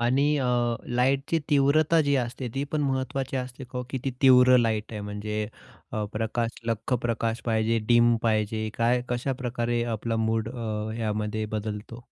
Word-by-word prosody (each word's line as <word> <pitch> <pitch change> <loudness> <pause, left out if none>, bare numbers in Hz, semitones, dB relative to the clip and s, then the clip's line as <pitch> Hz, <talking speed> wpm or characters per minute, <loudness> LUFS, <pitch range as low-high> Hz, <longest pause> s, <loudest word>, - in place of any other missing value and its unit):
आणि 130 +4 +2
अ, 130 - 0 0.5
लाईटची 135 +5 +2
तीव्रता 150 +3 +4
जी 140 -1 +1
असते, 125 0 -3
ती 135 - -1
पण 155 - +1
महत्वाची 135 0 -1
असते 130 +1 -5
का 125 +1 -7
हो, 125 - -3
किती 135 0 -2
तीव्र 125 -1 +7
लाईट 110 -2 0
आहे 105 - -4
म्हणजे 105 +1 -3 0.5
अ, 105 -1 -1
प्रकाश 115 +2 -2
लख्ख 115 +3 -1
प्रकाश 115 0 -1
पाहिजे, 115 0 +1
डीम 120 0 +5
पाहिजे, 110 -1 0
काय, 120 +1 +2
कशाप्रकारे 120 -1 -1
आपला 115 +1 -2
मूड 110 0 0
अ, 110 -3 -4
यामध्ये 110 0 -2
बदलतो? 105 +2 -5
120 Hz, 155 wpm, -26 LUFS, 110-130 Hz, 0.5 s, तीव्र